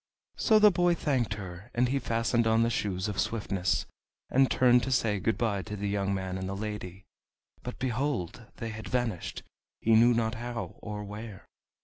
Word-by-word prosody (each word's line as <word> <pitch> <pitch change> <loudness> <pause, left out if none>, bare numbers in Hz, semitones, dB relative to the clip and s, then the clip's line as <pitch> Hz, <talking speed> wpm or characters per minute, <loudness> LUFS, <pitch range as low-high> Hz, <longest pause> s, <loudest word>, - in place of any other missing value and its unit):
So 220 - +4
the 210 -1 +7
boy 175 -1 +3
thanked 130 -9 0
her, 95 +1 -8
and 125 +1 +2
he 140 +1 +1
fastened 115 -1 +1
on 110 +1 +4
the 115 - +1
Shoes 95 -3 -1
of 105 -2 -3
Swiftness, 100 -5 0 0.5
and 135 0 +4
turned 125 -1 +5
to 130 - -3
say 110 -5 +2
good 110 +4 0
by 105 -5 0
to 105 +2 -6
the 100 0 -3
young 100 -1 0
man 95 -1 -2
and 95 0 -4
the 100 - -3
lady. 100 -3 -6 0.6
But, 125 - -6
behold! 125 - -2
they 115 - -5
had 110 0 -7
vanished, 120 -8 -2 0.4
he 115 - +2
knew 120 +2 +6
not 115 -1 +1
how 120 0 -5
or 105 -1 -5
where! 105 0 -8
110 Hz, 190 wpm, -29 LUFS, 100-120 Hz, 0.6 s, the